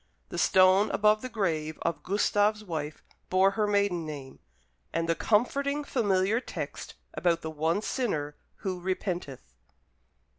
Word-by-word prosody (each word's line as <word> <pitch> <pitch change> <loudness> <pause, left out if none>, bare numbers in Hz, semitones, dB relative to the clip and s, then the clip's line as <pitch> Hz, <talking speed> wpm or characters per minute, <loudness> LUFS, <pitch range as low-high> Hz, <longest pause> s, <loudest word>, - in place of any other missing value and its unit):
The - - -4
stone 185 +2 +5
above 215 +1 +3
the 255 - -5
grave 160 -9 -1
of 170 -1 -1
Gustave's 205 +2 +1
wife 155 -5 -5 0.3
bore 190 +1 +4
her 210 0 0
maiden 200 -4 +1
name, 145 -4 -8 0.5
and 165 0 -1
the 165 - +3
comforting 280 - +1
familiar 205 -4 +1
text - - -6 0.2
about 170 -2 +1
the 160 - -4
one 160 +6 0
sinner 150 - -2 0.2
who 185 -2 -4
repenteth. 175 - -4
185 Hz, 135 wpm, -28 LUFS, 160-210 Hz, 0.5 s, stone